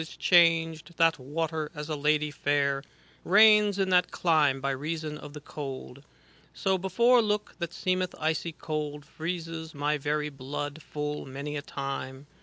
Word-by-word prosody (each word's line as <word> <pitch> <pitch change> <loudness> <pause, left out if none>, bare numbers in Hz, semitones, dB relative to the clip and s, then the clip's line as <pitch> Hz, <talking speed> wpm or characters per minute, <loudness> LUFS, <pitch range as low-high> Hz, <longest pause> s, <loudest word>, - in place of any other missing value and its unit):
Is 160 - -9
changed, 165 -2 +3
that 165 -2 +4
water, 155 +3 -3
as 150 0 -5
a 155 - -2
lady 150 +1 +1
fair. 140 -2 +1 0.4
Reigns 210 +1 +6
in 190 -1 0
that 180 -1 +4
clime 150 -6 +2
by 140 +1 -1
reason 155 +3 -3
of 150 -1 -10
the 150 - -7
cold. 140 -2 -7 0.3
' - - -30
So 190 -1 +2
before 235 +6 +4
look 210 -1 -1
that 170 -1 -3
seemeth 185 0 -1
icy 160 +1 -1
cold, 150 -2 -4
Freezes 165 0 -5
my 145 +1 0
very 150 +1 -1
blood 145 +2 -5
full 150 -1 -4
many 140 +3 -5
a 145 - -2
time. 135 -1 -5
155 Hz, 160 wpm, -28 LUFS, 145-170 Hz, 0.4 s, Reigns